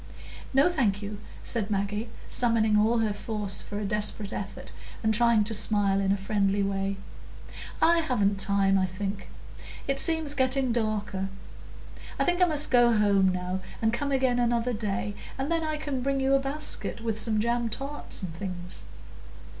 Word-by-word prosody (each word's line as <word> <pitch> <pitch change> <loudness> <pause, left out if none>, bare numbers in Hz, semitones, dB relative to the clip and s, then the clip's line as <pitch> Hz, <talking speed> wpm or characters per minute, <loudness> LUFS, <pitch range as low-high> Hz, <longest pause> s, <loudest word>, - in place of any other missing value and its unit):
"No, 275 +4 +4
thank 225 - 0
you," 205 0 -6 0.2
said 225 -3 -1
Maggie, 210 +2 -2 0.2
summoning 230 -3 +3
all 220 +3 +3
her 215 -2 0
force 205 -1 -4
for 205 - -6
a 210 - -3
desperate 210 0 +2
effort, 195 - -7 0.3
and 220 0 +2
trying 235 -1 +4
to 215 +2 0
smile 205 -2 +2
in 195 -1 +1
a 200 - +2
friendly 200 0 0
way. 195 0 -2 0.9
"I 335 +1 +5
haven't 205 -10 0
time, 195 -1 +3
I 185 - +1
think; 195 +2 -5 0.6
it 275 0 0
seems 320 -2 +1
getting 260 -2 +1
darker. 215 -4 -2 0.9
I - - +2
think 355 0 +1
I - - +7
must 300 -4 +3
go 240 -1 +5
home 200 -2 +3
now, 180 +1 -3 0.2
and 225 0 +1
come 280 +4 -2
again 260 -2 +1
another 240 0 +1
day, 205 -2 -3 0.2
and 270 +4 -3
then 330 -1 +1
I 310 -1 -2
can 290 -4 -3
bring 275 +1 0
you 270 0 +2
a 275 - +5
basket 275 -3 -1
with 225 -2 -2
some 215 -1 +1
jam 235 +1 0
tarts 275 -2 -5
and 175 -3 -5
things." 180 0 -6
220 Hz, 170 wpm, -27 LUFS, 200-260 Hz, 0.9 s, I